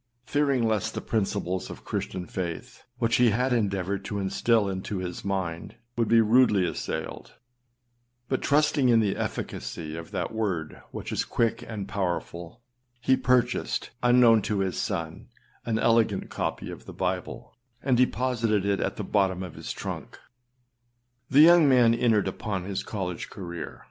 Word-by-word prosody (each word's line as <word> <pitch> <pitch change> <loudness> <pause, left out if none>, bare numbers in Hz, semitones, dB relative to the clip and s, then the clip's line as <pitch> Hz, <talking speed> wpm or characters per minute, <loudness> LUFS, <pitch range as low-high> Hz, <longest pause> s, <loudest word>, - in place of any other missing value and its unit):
Fearing 140 -5 +1
lest 110 -3 -1
the - - -1
principles 95 -4 -2
of - - -10
Christian 90 -1 -3
faith, 90 +8 -6
which 115 -2 +2
he 125 -1 +5
had 125 +4 +1
endeavoured 100 -3 -1
to 105 - -3
instill 100 +2 +2
into 95 +1 -3
his 90 -1 -5
mind, 95 -4 -3 0.2
would 115 -2 +1
be 115 0 +5
rudely 110 -4 +4
assailed, 80 -2 -5 0.9
but 130 - -1
trusting 145 -2 +3
in 115 -1 +5
the 105 -3 +1
efficacy 80 -2 -4
of 85 0 -7
that - - -3
word 95 -9 -3
which - - -7
is - - 0
quick 115 -1 0
and 105 -4 -5
powerful, 90 +1 -4 0.4
he 130 +2 +3
purchased, 125 -1 +1
unknown 120 -2 +6
to 100 0 -1
his 95 -1 -1
son, 80 -1 -4 0.4
an 110 -1 +1
elegant 115 -3 +2
copy - - -3
of - - -10
the - - -8
Bible, - - -4 0.3
and 130 -2 +3
deposited 120 -4 +1
it 100 -2 +1
at - - -1
the - - -4
bottom 95 -3 +1
of 90 -4 -7
his - - -6
trunk. - - -6 1.1
The 140 +3 +6
young 165 -2 +7
man 120 -3 +5
entered 115 -4 +2
upon 95 -1 -3
his 95 0 -3
college 90 -5 -4
career. 85 -4 -7
105 Hz, 155 wpm, -27 LUFS, 95-120 Hz, 1.1 s, young